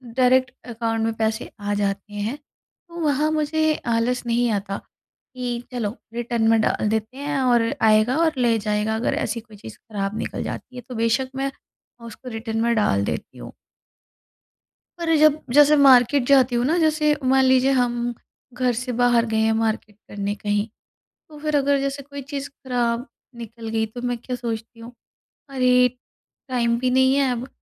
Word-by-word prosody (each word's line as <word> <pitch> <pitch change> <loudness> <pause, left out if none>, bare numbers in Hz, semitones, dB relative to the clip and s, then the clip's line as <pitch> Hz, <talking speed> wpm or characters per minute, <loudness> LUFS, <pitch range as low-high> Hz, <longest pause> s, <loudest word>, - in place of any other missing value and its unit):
Direct 255 0 +3 0.2
account 225 -1 -2
में 225 - 0
पैसे 220 0 -2
आ 205 0 -2
जाते 200 0 -2
हैं। 210 +7 -3
तो 340 +3 -17
वहाँ 300 0 +1
मुझे 310 0 +1
आलस 235 +2 0
नहीं 235 0 +1
आता, 200 -1 -2
कि 245 -2 -8
चलो 230 -3 -3 0.2
रिटर्न 235 -1 -1
में 225 - +4
डाल 215 - 0
देते 220 +4 -2
हैं 290 0 -2
और 240 -2 +2
आएगा 220 +5 +4
और 320 - +2
ले 235 -2 +2
जाएगा 210 +1 -1
अगर 225 - -1
ऐसी 230 +2 -2
कोई 220 -2 -15
चीज़ 110 - -11
खराब 205 -1 -4
निकल - - -4
जाती 255 - -7
है 245 - -6
तो 250 - -6
बेशक 230 +3 +1
मैं 275 0 -2 0.5
उसको 250 +2 -10
रिटर्न 225 0 -4
में 235 0 +2
डाल 100 - +2
देती - - -5
हूँ। - - -10 1.5
पर 330 -1 +1
जब 305 0 +5 0.2
जैसे 295 +1 +7
मार्केट 265 -1 +6
जाती 260 -3 +4
हूँ 240 - +1
ना 325 - +2
जैसे 310 -2 +2
मान 265 +1 +4
लीजिए 260 0 +4
हम 240 -1 0 0.4
घर 250 0 0
से 250 +2 -3
बाहर 240 -1 +4
गए 220 - +1
हैं 220 0 +3
मार्केट 220 -2 -2
करने 200 0 -3
कहीं 205 +1 -1 0.6
तो 300 - -12
फिर 305 0 -1
अगर 280 0 +2
जैसे 275 +1 -3
कोई 280 0 -9
चीज़ 280 0 -4
खराब 245 -2 -2 0.3
निकल 230 -1 -8
गई 220 0 0
तो 240 +3 -9
मैं 245 -1 -1
क्या 250 +1 -5
सोचती 230 -1 -6
हूँ, 235 +2 -10 0.6
अरे! 250 -1 +4 0.6
टाइम 235 -2 +1
भी 255 - +1
नहीं 260 +1 +4
है 275 -2 +2
अब 245 +1 -4
245 Hz, 175 wpm, -22 LUFS, 225-265 Hz, 1.5 s, जैसे